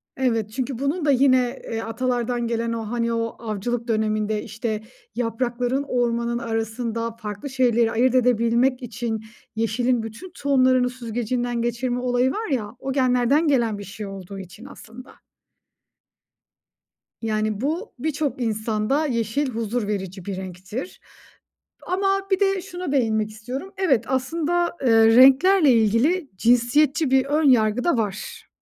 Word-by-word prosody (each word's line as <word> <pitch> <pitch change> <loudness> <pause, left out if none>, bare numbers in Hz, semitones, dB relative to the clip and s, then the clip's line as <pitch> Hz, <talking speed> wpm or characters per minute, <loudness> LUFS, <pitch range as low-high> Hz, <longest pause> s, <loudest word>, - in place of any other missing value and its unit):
Evet, 230 -5 0
çünkü 260 0 -3
bunun 295 +4 -1
da 285 - +4
yine, 255 -2 +3
eee, 225 0 -2
atalardan 240 +1 -1
gelen 230 0 -1
o, 225 -1 -4
hani, 235 -1 0
o 230 0 -2
avcılık 230 +2 -3
döneminde, 215 -1 0
işte, 220 0 -4 0.3
yaprakların 245 +3 -1
ormanın 235 -1 0
arasında 230 0 -3
farklı 215 +3 -7
şeyleri 240 -3 +2
ayırt 255 +2 +2
edebilmek 245 +1 +2
için 225 -1 -4 0.3
yeşilin 230 +2 0
bütün 230 +12 -9
tohumlarını 255 -3 +3
süzgecinden 240 0 -3
geçirme 245 +1 -1
olayı 250 +1 +1
var 440 +5 -3
ya, 230 -4 -2
o 270 - -4
genlerden 260 +4 +2
gelen 235 -7 +2
bir 205 - -7
şey 200 +2 -8
olduğu 195 0 -8
için 190 +6 -11
aslında. 255 -2 -12 2.1
Yani 215 -1 -1
bu, 325 - -2
birçok 290 -2 -2
insanda 220 +6 0
yeşil 240 +2 -1
huzur 225 -1 -2
verici 190 -3 -4
bir 200 -2 -3
renktir 190 - -7 0.9
ama 390 +1 0
bir 380 - +3
de 390 -1 +2
şuna 360 -4 -6
değinmek 220 -5 +1
istiyorum. 255 - -7
Evet 275 - +2
aslında, 335 +6 -1
eee, 225 -3 +5
renklerle 275 +5 +6
ilgili 240 - +2
cinsiyetçi 260 - +3
bir 265 0 +4
ön 300 +3 +1
yargı 225 -1 +3
da 345 -8 +2
var. 225 - -4
240 Hz, 135 wpm, -23 LUFS, 225-270 Hz, 2.1 s, renklerle